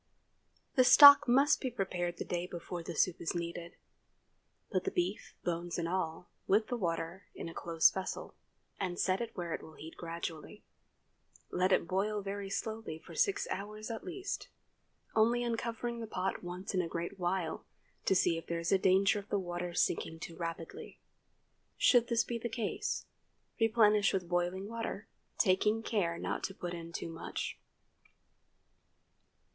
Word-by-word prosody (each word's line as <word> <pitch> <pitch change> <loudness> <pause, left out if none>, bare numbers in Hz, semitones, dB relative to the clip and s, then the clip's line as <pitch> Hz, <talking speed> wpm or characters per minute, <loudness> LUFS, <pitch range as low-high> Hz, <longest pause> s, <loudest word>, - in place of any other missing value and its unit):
The 255 - +5
stock 285 +2 +10
must 275 +5 +4
be 260 - -1
prepared 180 -6 -2
the - - -4
day 175 0 -2
before 175 0 -6
the 165 0 -6
soup 180 +2 +1
is 170 - -2
needed. 170 0 -5 1.0
Put 185 -3 +1
the - - 0
beef, 180 +3 -2
bones 175 0 -2
and 170 -1 -1
all, 175 -1 -2 0.2
with 215 +2 +3
the 245 - 0
water 170 -2 -3
in - - -6
a 165 - -7
close 165 -1 +4
vessel, 190 -1 -5 0.5
and 180 -3 -2
set 185 +3 +1
it 230 -2 -5
where 175 -2 -3
it - - -3
will 160 - -12
heat 160 +2 -10
gradually. 170 +3 -6 0.9
Let 185 +1 +2
it 170 - +3
boil 205 +3 0
very 200 0 -4
slowly 220 -5 -4
for - - -13
six 405 0 +1
hours 215 +3 -5
at 225 - -5
least, 380 +2 -4 0.7
only 235 +2 +3
uncovering 235 0 -2
the 225 - -5
pot 190 -2 -2
once 180 +3 -5
in 185 - +2
a 170 - -3
great 170 +4 -4
while 175 -2 -1 0.4
to 190 - +3
see 170 -2 +3
if - - -14
there 170 - -1
is 170 - -2
danger 195 +2 +4
of 200 - -12
the 205 - +1
water 175 -2 -4
sinking 165 -1 0
too 165 - -7
rapidly. 165 -1 -6 0.8
Should 240 -2 +5
this 235 -1 +2
be 235 -1 -4
the 235 - -3
case, 225 -2 -2 0.5
replenish 215 -3 +4
with 185 -3 -1
boiling 175 +2 -1
water, 225 -2 -4 0.3
taking 210 +3 +3
care 175 -7 0
not - - -3
to 195 - -6
put 175 -2 -5
in 170 -1 -7
too 165 - -5
much. 165 - -5
190 Hz, 165 wpm, -33 LUFS, 170-220 Hz, 1.0 s, stock